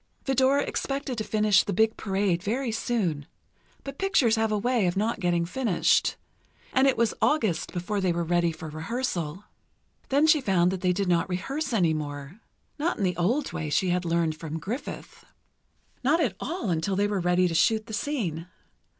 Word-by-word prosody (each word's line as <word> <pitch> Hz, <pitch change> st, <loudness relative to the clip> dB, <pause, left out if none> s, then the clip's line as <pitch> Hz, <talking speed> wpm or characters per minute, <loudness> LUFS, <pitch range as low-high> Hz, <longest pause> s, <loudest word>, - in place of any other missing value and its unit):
Vidor 270 Hz, +1 st, +3 dB
expected 275 Hz, -2 st, -2 dB
to -, -, -1 dB
finish 215 Hz, -2 st, +3 dB
"The 200 Hz, -, -3 dB
Big 220 Hz, +4 st, +2 dB
Parade" 195 Hz, -3 st, 0 dB
very 235 Hz, +5 st, -1 dB
soon, 190 Hz, -10 st, -1 dB, 0.6 s
but 275 Hz, 0 st, -8 dB
pictures 340 Hz, -, +3 dB
have 220 Hz, -1 st, 0 dB
a 210 Hz, -, +1 dB
way 235 Hz, -2 st, +1 dB
of 175 Hz, +2 st, -1 dB
not 220 Hz, +2 st, 0 dB
getting 175 Hz, -2 st, +1 dB
finished, 215 Hz, +1 st, +1 dB, 0.6 s
and 265 Hz, +1 st, +4 dB
it 270 Hz, -, +2 dB
was 230 Hz, -2 st, +2 dB
August 220 Hz, -, +1 dB
before 195 Hz, +3 st, -2 dB
they 185 Hz, -2 st, +2 dB
were 170 Hz, 0 st, -1 dB
ready 170 Hz, 0 st, +1 dB
for 160 Hz, 0 st, -8 dB
rehearsal. 170 Hz, 0 st, -3 dB, 0.7 s
Then 285 Hz, +3 st, +4 dB
she 310 Hz, -2 st, +5 dB
found 185 Hz, -6 st, +2 dB
that 190 Hz, -1 st, -4 dB
they 180 Hz, -, +2 dB
did 195 Hz, +2 st, -1 dB
not 175 Hz, +1 st, +1 dB
rehearse 270 Hz, -, -3 dB
any 175 Hz, -8 st, +2 dB
more—not 155 Hz, -, -5 dB
in -, -, -2 dB
the 180 Hz, -2 st, +1 dB
old 235 Hz, -, 0 dB
way 155 Hz, -, -3 dB
she 180 Hz, +5 st, +1 dB
had 180 Hz, 0 st, +1 dB
learned 165 Hz, -2 st, 0 dB
from 155 Hz, 0 st, -6 dB
Griffith—not 215 Hz, -, -6 dB, 1.0 s
at 240 Hz, -, 0 dB
all 330 Hz, -, -3 dB
until 170 Hz, +4 st, 0 dB
they 200 Hz, +2 st, +2 dB
were 205 Hz, -1 st, -1 dB
ready 180 Hz, +1 st, +2 dB
to 170 Hz, -, -3 dB
shoot 215 Hz, +6 st, +2 dB
the 220 Hz, -, -9 dB
scene. 195 Hz, -, -2 dB
195 Hz, 180 wpm, -26 LUFS, 175-240 Hz, 1.0 s, she